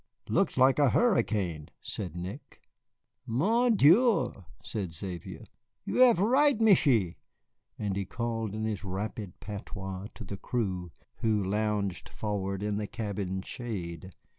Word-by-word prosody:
"Looks - - +1
like 130 +2 +5
a 145 -3 +5
hurricane," 100 - +1
said 90 -5 -5
Nick. 95 +10 -7 0.7
"Mon 220 - +3
Dieu," 195 - +4 0.2
said 95 -7 -4
Xavier, 90 0 -6 0.4
"you - - -2
have 250 -6 +7
right, 265 +8 +4
Michié," 140 - +4 0.6
and 100 -2 -2
he 100 0 -2
called 115 0 -3
in 110 - -3
his 110 -2 -2
rapid 100 0 -5
patois 100 -2 -6
to 110 - -8
the 100 0 -6
crew, 95 -7 -2 0.3
who 110 -3 +1
lounged 105 -1 -1
forward 100 -2 -3
in 105 -1 -1
the 105 -1 -2
cabin's 100 -4 -3
shade. 95 -6 -5
105 Hz, 130 wpm, -29 LUFS, 95-125 Hz, 0.7 s, have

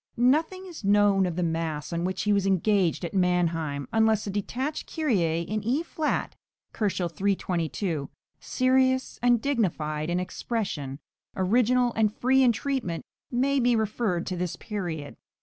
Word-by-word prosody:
Nothing 315 +10 +2
is 345 -9 -10
known 200 -1 +4
of 175 - -3
the 180 - 0
mass 160 -1 -2
on 170 +1 -1
which 185 0 -2
he 210 - +2
was 200 -1 +1
engaged 190 -2 +2
at 170 - -6
Mannheim, 165 -6 0
unless 220 -1 +3
a 200 - -3
detached 255 +9 -3
Kyrie 180 - +1
in 210 +4 -3
E 260 +9 +1
flat 315 -2 -2 0.4
(322 180 -4 -1
K.), - - -35 0.3
serious 260 0 +1
and 240 -1 +4
dignified 165 - -1
in 175 +1 +1
expression, 180 - -3 0.4
original 240 +5 +2
and 215 -2 +3
free 265 +2 +3
in 250 -2 +6
treatment, 230 -7 -3 0.2
may 270 +3 +1
be 245 -1 +3
referred 215 -5 -1
to 185 - -3
this 180 -1 -3
period. 170 -9 -5
200 Hz, 150 wpm, -27 LUFS, 170-245 Hz, 0.4 s, in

